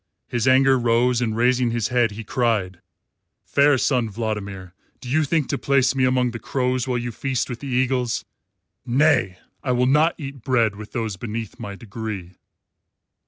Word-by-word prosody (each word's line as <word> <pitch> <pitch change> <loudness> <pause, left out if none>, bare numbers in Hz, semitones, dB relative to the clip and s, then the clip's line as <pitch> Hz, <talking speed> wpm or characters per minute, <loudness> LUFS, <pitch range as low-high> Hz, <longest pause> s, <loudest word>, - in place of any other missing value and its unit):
His 120 0 -1
anger 130 0 +5
rose, 120 +1 +2
and 110 -2 -1
raising 125 +1 +2
his 115 -2 -1
head 120 -2 +2
he 115 +2 -7
cried: 105 -7 -1 0.6
"Fair 140 0 +4
Sun 125 -3 +1
Vladimir, 100 -4 -5 0.3
do - - -10
you 155 +5 +2
think 150 -1 0
to 140 - -1
place 140 -1 +2
me 130 -1 +2
among 125 -1 +2
the 120 - -6
crows 125 +1 -1
while 125 -1 0
you 120 0 -3
feast 130 +1 -2
with 120 - -6
the 140 - -7
eagles? 125 -2 0 0.6
Nay! 130 -6 +2 0.3
I 130 -3 0
will 125 0 +2
not 150 +5 +3
eat 140 -4 -8
bread 115 -4 +1
with 105 +1 -10
those 110 -5 -3
beneath 115 +1 -6
my 100 -1 -6
degree." 105 -4 -6
120 Hz, 170 wpm, -22 LUFS, 110-130 Hz, 0.6 s, anger